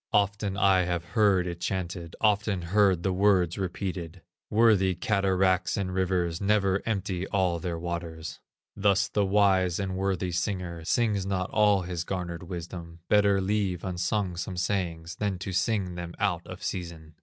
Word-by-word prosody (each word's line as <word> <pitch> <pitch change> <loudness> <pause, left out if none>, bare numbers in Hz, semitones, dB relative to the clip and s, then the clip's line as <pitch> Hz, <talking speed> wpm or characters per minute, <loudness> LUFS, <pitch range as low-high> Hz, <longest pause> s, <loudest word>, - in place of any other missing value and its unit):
Often 100 -1 +1
I 95 -2 +4
have 85 -1 -2
heard 100 -4 +4
it 85 -1 -5
chanted, 85 -2 -3
Often 105 -3 +2
heard 100 -5 +4
the 95 - +1
words 95 -3 +2
repeated: 90 -2 -4 0.3
"Worthy 105 -4 +4
cataracts 95 -2 +1
and 95 -2 -2
rivers 90 -2 0
Never 100 -1 +2
empty 95 -4 -2
all 90 -3 +1
their 85 0 -3
waters." 85 -1 -5 0.4
Thus 100 -1 +2
the 105 - 0
wise 95 -3 +3
and 95 -2 -3
worthy 95 -1 -1
singer 90 -2 -3
Sings 105 -2 +1
not 95 -1 -2
all 105 -3 +3
his 85 -1 -3
garnered 85 -2 -4
wisdom; 85 -1 -7
Better 100 -1 +4
leave 95 -2 -1
unsung 90 +1 -1
some 90 +1 -4
sayings 90 -2 -2
Than 100 -3 -1
to 95 +1 -5
sing 95 -2 0
them 85 0 -6
out - - -1
of - - -9
season. 85 -3 -5
95 Hz, 155 wpm, -27 LUFS, 85-100 Hz, 0.4 s, I